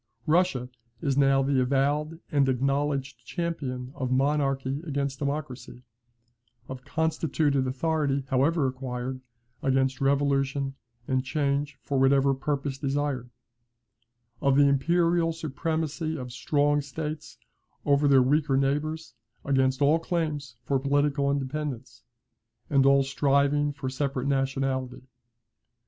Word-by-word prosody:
Russia 160 -6 +2 0.4
is 140 -3 +1
now 135 -1 +4
the 135 -1 +2
avowed 145 +5 0
and 140 -2 +3
acknowledged 135 -1 -1
champion 130 -6 -4
of 130 -3 -3
Monarchy 135 0 +1
against 140 -4 -3
Democracy; 140 -3 -4 0.8
of 130 0 -8
constituted 150 -3 0
authority, 140 0 0
however 140 +3 +2
acquired, 130 0 -4 0.4
against 135 0 +1
revolution 135 0 +1 0.3
and 130 -1 +1
change 140 0 -1
for 135 +2 -1
whatever 135 +1 +4
purpose 140 0 -3
desired; 140 -3 -2 1.1
of 140 -2 +3
the 145 0 +6
imperial 170 +4 +2
supremacy 160 0 -3
of 125 -3 -7
strong 145 +3 +1
states 150 +2 -6 0.5
over 145 0 +3
their 135 -2 +6
weaker 145 +1 +2
neighbours 145 +1 -1 0.3
against 130 0 +2
all 150 +4 +4
claims 155 -7 -3
for 135 -1 0
political 140 +1 +1
independence, 140 -1 -3 0.7
and 135 -1 +4
all 140 0 +5
striving 140 +1 +2
for 140 -1 -6
separate 130 0 -2
nationality. 135 -2 -1
140 Hz, 110 wpm, -27 LUFS, 135-150 Hz, 1.1 s, the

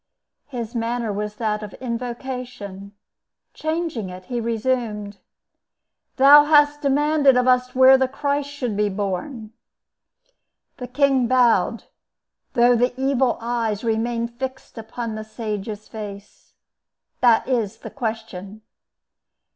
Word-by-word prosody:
His 235 -5 -6
manner 230 -2 -2
was 210 +1 -4
that 210 -1 -2
of 210 -1 -8
invocation; 240 -5 -6 0.6
changing 315 - -3
it, 185 0 -10
he 240 +2 -3
resumed: 225 -3 -2 1.0
"Thou 290 +2 +8
hast 295 -1 +4
demanded 285 -1 +3
of 250 0 +2
us 250 0 +2
where 260 +1 +7
the 265 - +2
Christ 285 +1 -2
should 255 -7 -4
be 210 0 +1
born." 210 +4 -4 1.2
The 250 - -6
king 265 -1 +2
bowed, 250 -1 +3 0.7
though 240 +1 +5
the 245 +2 0
evil 265 -2 +1
eyes 230 -3 -2
remained 235 +1 -2
fixed 260 0 -6
upon 225 +1 -5
the 215 0 -5
sage's 215 -1 -6
face. 205 -2 -10 0.7
"That 235 -3 +4
is 230 -5 -1
the - - -10
question." 220 -4 -6
235 Hz, 115 wpm, -22 LUFS, 215-260 Hz, 1.2 s, Thou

